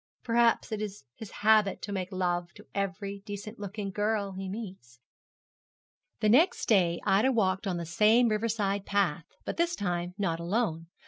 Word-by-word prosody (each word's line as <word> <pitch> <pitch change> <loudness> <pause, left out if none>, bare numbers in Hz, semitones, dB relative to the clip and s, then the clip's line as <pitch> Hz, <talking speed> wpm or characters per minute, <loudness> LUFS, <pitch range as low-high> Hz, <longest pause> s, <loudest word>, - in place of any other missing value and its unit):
Perhaps 235 -1 +2
it 215 -1 -2
is 205 -6 -5
his 220 - -9 0.2
habit 215 -2 +4
to 205 - -4
make 190 -1 -3
love 175 -2 -1
to 210 - -14
every 200 0 -3
decent 205 +2 -7
looking 205 0 -5
girl 205 0 0
he 190 0 -6
meets.' 185 - -8 1.2
The 215 - +3
next 295 - +4
day 175 -6 +3
Ida 205 +6 +3
walked 195 -4 +1
on 180 -2 -1
the 170 - -4
same 215 +8 +4
riverside 210 -2 0
path, 185 -5 +1 0.2
but - - -4
this 340 +1 +1
time 175 - -2
not 170 -5 -1
alone. 170 -2 -1
200 Hz, 160 wpm, -29 LUFS, 185-215 Hz, 1.2 s, habit